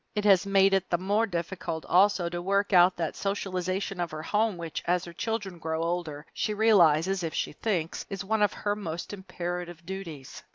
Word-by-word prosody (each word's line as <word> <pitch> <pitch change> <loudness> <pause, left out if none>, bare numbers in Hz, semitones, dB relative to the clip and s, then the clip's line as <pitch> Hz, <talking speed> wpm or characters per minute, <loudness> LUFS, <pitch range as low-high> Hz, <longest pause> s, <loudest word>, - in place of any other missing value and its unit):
It 210 0 -1
has 195 -1 +5
made 195 0 +4
it 190 -1 +1
the 175 - +2
more 205 +5 +1
difficult, 170 -2 -4
also, 185 0 +4
to 175 0 -4
work 200 +2 +1
out 180 0 +6
that 165 -2 -2
socialization 190 -1 -2
of 175 -1 -1
her 155 0 -6
home 210 +2 +1
which, 165 -2 -5
as 180 +1 +1
her 170 - -9
children 205 -2 -3
grow 160 0 -2
older, 165 -3 -3
she 210 - -1
realizes, 190 -4 +4
if 165 -2 -3
she - - -1
thinks, 170 -2 -2
is 195 -1 -5
one 220 +1 0
of 205 - +3
her 205 0 -1
most 175 -3 -5
imperative 175 -3 -5
duties. 170 -7 -7
180 Hz, 195 wpm, -28 LUFS, 170-200 Hz, -, out